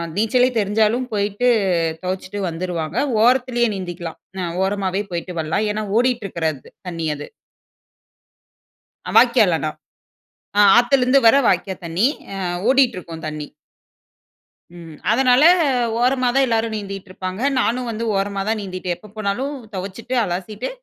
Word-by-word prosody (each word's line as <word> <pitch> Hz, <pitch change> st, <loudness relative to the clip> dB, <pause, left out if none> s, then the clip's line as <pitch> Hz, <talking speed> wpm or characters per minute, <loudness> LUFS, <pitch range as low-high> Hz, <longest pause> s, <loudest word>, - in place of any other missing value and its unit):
நீச்சலே 245 Hz, +4 st, +3 dB
தெரிஞ்சாலும் 220 Hz, +4 st, +1 dB
போயிட்டு 205 Hz, +3 st, 0 dB, 0.6 s
தொவச்சுட்டு 185 Hz, +2 st, -4 dB
வந்துருவாங்க. 170 Hz, +1 st, -4 dB, 0.3 s
ஓரத்திலே 245 Hz, 0 st, +3 dB
நீந்திக்கலாம் 175 Hz, -3 st, -6 dB, 0.2 s
அ -, -, -2 dB, 0.2 s
ஓரமாவே 195 Hz, 0 st, -1 dB
போய்ட்டு 175 Hz, +1 st, -4 dB
வரலாம். 160 Hz, +7 st, -1 dB
ஏன்னா, 215 Hz, +1 st, -3 dB
ஓடிட்டு 245 Hz, -2 st, +1 dB
இருக்கறது 160 Hz, -6 st, -3 dB, 0.2 s
தண்ணி 165 Hz, -2 st, -4 dB
அது. 145 Hz, -, -9 dB, 1.9 s
வாய்க்கால் 235 Hz, -8 st, +5 dB
ஆனா. 155 Hz, -1 st, -2 dB, 0.9 s
அ -, -, +5 dB, 0.2 s
ஆத்துலந்து 250 Hz, +2 st, +4 dB
வர 225 Hz, -, +7 dB
வாய்க்கா 190 Hz, +1 st, +1 dB
தண்ணீ. 170 Hz, +8 st, +2 dB, 0.3 s
அ -, -, -5 dB, 0.3 s
ஓடிட்டு 265 Hz, -3 st, +4 dB
இருக்கும் 165 Hz, -2 st, -10 dB
தண்ணி. 150 Hz, -1 st, -6 dB, 1.3 s
ம். 165 Hz, -2 st, -11 dB, 0.2 s
அதனால, 250 Hz, +4 st, +4 dB, 0.6 s
ஓரமா 255 Hz, 0 st, +2 dB
தான் 270 Hz, 0 st, +4 dB
எல்லாரும் 225 Hz, -2 st, 0 dB
நீந்திட்டு 195 Hz, -2 st, -7 dB
இருப்பாங்க. 185 Hz, +3 st, -5 dB, 0.2 s
நானும் 245 Hz, +1 st, -1 dB
வந்து 225 Hz, +1 st, -4 dB
ஓரமா 195 Hz, 0 st, -1 dB
தான் 220 Hz, 0 st, 0 dB
நீந்திட்டே. 185 Hz, -2 st, -4 dB
எப்போ 210 Hz, +5 st, -15 dB
போனாலும் 215 Hz, +8 st, -2 dB, 0.2 s
தொவச்சுட்டு 200 Hz, +7 st, -5 dB
அலசிட்டு 205 Hz, +6 st, -4 dB
205 Hz, 125 wpm, -20 LUFS, 180-240 Hz, 1.9 s, வர